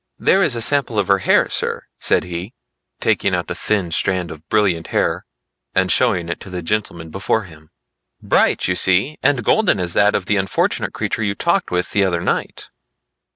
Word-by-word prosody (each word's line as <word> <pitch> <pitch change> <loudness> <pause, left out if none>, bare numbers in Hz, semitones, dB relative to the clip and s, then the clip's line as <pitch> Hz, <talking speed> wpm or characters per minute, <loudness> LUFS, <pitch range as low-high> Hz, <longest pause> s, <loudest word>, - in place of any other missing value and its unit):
"There 195 - +3
is 145 -10 +2
a 115 - 0
sample 140 -5 +1
of 100 -1 0
her 100 0 +4
hair, 95 - +3
sir," - - -2 0.2
said - - +3
he, 90 +5 -7 0.4
taking - - +1
out - - -4
a - - 0
thin 95 -5 -1
strand 90 0 -1
of 80 +1 -12
brilliant 95 -6 +1
hair - - -1 0.5
and 95 -1 +2
showing 100 -5 +2
it 85 - -4
to - - -11
the 90 -2 -5
gentleman 85 -4 -3
before 100 +4 -1
him. 80 -4 -15 0.5
"Bright - - +1
you 90 - +1
see, 95 +13 +2
and 140 -5 +2
golden 220 - +3
as 90 -1 -2
that 105 0 +3
of 95 - -1
the 105 - +1
unfortunate 95 -1 -1
creature - - -2
you 100 -2 -1
talked 170 - 0
with 90 0 -2
the 100 - +2
other 90 -3 0
night." - - -3
95 Hz, 195 wpm, -19 LUFS, 90-110 Hz, 0.5 s, her